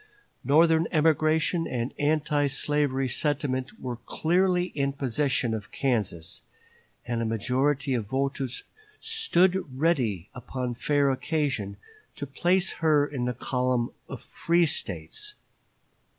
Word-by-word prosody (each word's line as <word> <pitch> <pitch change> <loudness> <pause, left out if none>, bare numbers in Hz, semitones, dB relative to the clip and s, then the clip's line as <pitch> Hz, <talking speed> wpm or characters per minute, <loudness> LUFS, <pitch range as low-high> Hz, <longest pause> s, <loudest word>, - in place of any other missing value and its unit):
Northern 160 +3 +4
emigration 160 +1 +2
and 120 0 -3
anti 145 0 +2
slavery 140 -1 0
sentiment 135 - -1
were 125 -2 -4
clearly 175 +9 +1
in 140 -6 -2
possession 135 -2 0
of 105 -3 -5
Kansas, 105 -11 -1 0.6
and 115 0 -2
a - - 0
majority 130 +5 0
of 115 -5 -1
voters 135 +1 -2 0.4
stood 190 - +2
ready 125 - +1
upon 125 0 -4
fair 140 +3 +2
occasion 130 -8 -1 0.4
to 145 - -5
place 175 +7 +1
her 150 -3 +4
in 135 -4 -3
the 125 0 -2
column 125 -1 0 0.2
of - - -7
free 170 +1 +2
States. 85 - -3
140 Hz, 115 wpm, -27 LUFS, 125-155 Hz, 0.6 s, Northern